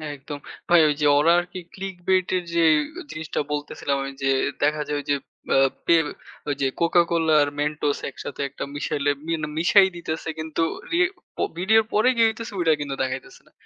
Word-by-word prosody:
একদম। 145 +1 -8 0.3
ভাই 175 0 +7
ওই 150 - +2
যে - - +3
ওরা 160 +3 +4
আরকি 175 +1 -6
Clickbait 190 -1 -1
এর 180 - -3
যে 170 - +3
এ - - +4 0.3
জিনিসটা 160 0 -4
বলতেছিলাম, 145 -1 -2
আমি 135 - -5
যে 135 - +3 0.3
দেখা 150 +1 +2
যায় 145 - -1
ওইযে 145 0 0 0.4
আ - - +5 0.3
পেল 165 -3 +4 0.4
ওই 145 - 0
যে 135 - +3
CocaCola 170 -1 +3
আর 145 - -1
Mentos 150 -1 0
একসাথে 140 +1 -7
একটা - - -6
মিশাইলে 145 0 0 0.2
মি 165 - 0 0.3
মিশাই 190 +3 +6
দিতেছে। 160 -1 -4
কিন্তু 160 +1 -1 0.3
রি 340 - +2 0.4
পো - - 0
ভিডিওর 220 +5 +4
পরে 215 +4 +4
কি 230 - +2
হইতেসে, 225 0 -4
ওইটা 165 -2 +4
কিন্তু 140 -1 -3
দেখাইতেছে 370 - -5
না। - - -24
160 Hz, 180 wpm, -24 LUFS, 145-180 Hz, 0.4 s, ভাই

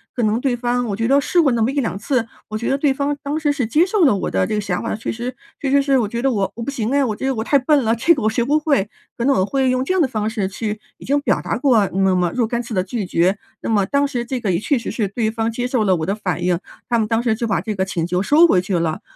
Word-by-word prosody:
可 245 - -1
能 215 +1 +1
对 255 -1 0
方 245 0 -1
我 205 -4 -2
觉 225 +3 -2
得 275 +4 +4
试 345 +5 +2
过 285 -5 +3
那 235 -1 0
么 220 - +2
1-2 265 -9 -1
次， 240 +2 0 0.2
我 215 - -4
觉 235 - -3
得 270 - +1
对 280 -1 +2
方 280 +2 -1
当 285 +2 -2
时 305 -2 +1
是 275 -5 -1
接 305 +9 +3
受 385 -2 +2
了 260 - +4
我 195 - -3
的 95 0 +1
这 - - -2
个 210 - 0
想 185 -3 -2
法。 - - -2
其 215 - -4
实 240 +3 -5 0.2
其 275 - -2
实 280 +1 +4
是 275 -1 +2
我 230 -4 +1
觉 235 +3 -4
得 270 +1 +2
我 200 -4 0
我 230 - -5
不 280 - -3
行 235 -5 -2
唉， 285 0 +3
我 235 -5 0
觉 210 - -5
得 270 -1 0
我 220 - -2
太 280 +4 +3
笨 280 +1 +2
了， 225 0 +2
这 285 +9 +3
个 275 - -4
我 215 - +3
学 235 +2 0
不 290 +4 +3
会， 280 -10 +1 0.3
可 235 - -1
能 275 0 +3
我 185 - +2
会 265 +4 +1
用 255 0 +1
这 320 - -1
样 375 - +2
的 295 - +3
方 215 -4 -2
式 215 -4 -2
去 210 +2 -4 0.2
已 - - -14
经 285 +2 +1
表 285 - 0
达 - - -2
过 245 -5 +3
那 190 0 +2
么 180 -1 +1
若 240 -3 +1
干 235 +1 -2
次 235 - -7
的 185 - +2
拒 210 +1 -3
绝。 180 +3 +1 0.2
那 - - -5
么 205 -3 +2
当 285 0 +1
时 245 -3 -3
这 250 +1 -3
个 220 -4 -2
也 - - +2
确 265 +6 +1
实 230 - -5
是 210 -5 -1
对 220 +2 -1
方 225 +1 -2
接 245 +2 -2
受 250 -3 +1
了 195 -3 +3
我 160 - -2
的 195 - -1
反 185 -4 -3
应， 175 0 +1 0.3
他 240 - +1
们 220 - +1
当 225 +1 0
时 235 -2 +1
就 235 - -3
把 210 - 0
这 215 -2 -4
个 190 - 0
请 175 -3 -2
求 180 +1 0
收 310 +9 +6
回 185 - +3
去 185 -1 -1
了。 160 -2 -2
235 Hz, 350 characters per minute, -20 LUFS, 210-270 Hz, 0.3 s, 收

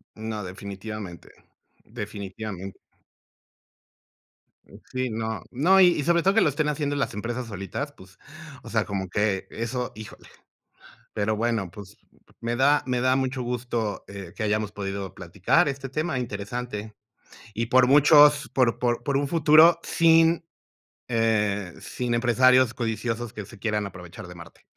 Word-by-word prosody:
No, 110 -1 -5
definitivamente, 100 0 -8 0.5
definitivamente. 100 -3 -7 1.9
Mm, - - -15 0.2
sí, 130 -1 -1
no, 110 -1 -3
no. 175 +10 +4
Y 185 - +8
y 170 -5 0
sobre 170 +2 +3
todo 195 +3 +3
que 225 - +5
lo 155 - +4
estén 150 +2 -1
haciendo 145 -1 -1
las 140 - -1
empresas 120 +4 -4
solitas, 105 +8 -5
pues, 95 -5 -18 0.4
o - - -10
sea, 110 -2 +1
como 95 -2 -4
que 100 0 0
eso 120 +2 -4
híjole. 110 0 -11 0.9
Pero 105 +1 0
bueno, 110 -5 -1
pues, 100 +2 -12 0.4
me 115 +1 -2
da 145 +3 +4
me 125 -1 -1
da 130 +1 +3
mucho 130 0 -1
gusto, 120 -3 -3
eh, 100 -4 -9
que - - -4
hayamos 105 -1 0
podido 100 -2 -5
platicar 95 - +1
este 135 -1 -5
tema 155 0 -2
interesante. 110 -1 -5 0.6
Y 115 +3 -1
por 125 +1 +5
muchos, 145 +1 +6
por 125 -3 +1
por 120 -1 0
por 140 +1 0
un 140 0 0
futuro, 160 +2 +6
sin, 165 0 +4 0.6
eh, 105 -5 0
sin 125 -1 -3
empresarios 125 +1 +4
codiciosos 115 0 -3
que 105 -4 -7
se 110 +1 -14
quieran 105 -1 -1
aprovechar 90 -2 -10
de 90 - -11
Marte. 85 0 -14
115 Hz, 150 wpm, -25 LUFS, 105-135 Hz, 1.9 s, Y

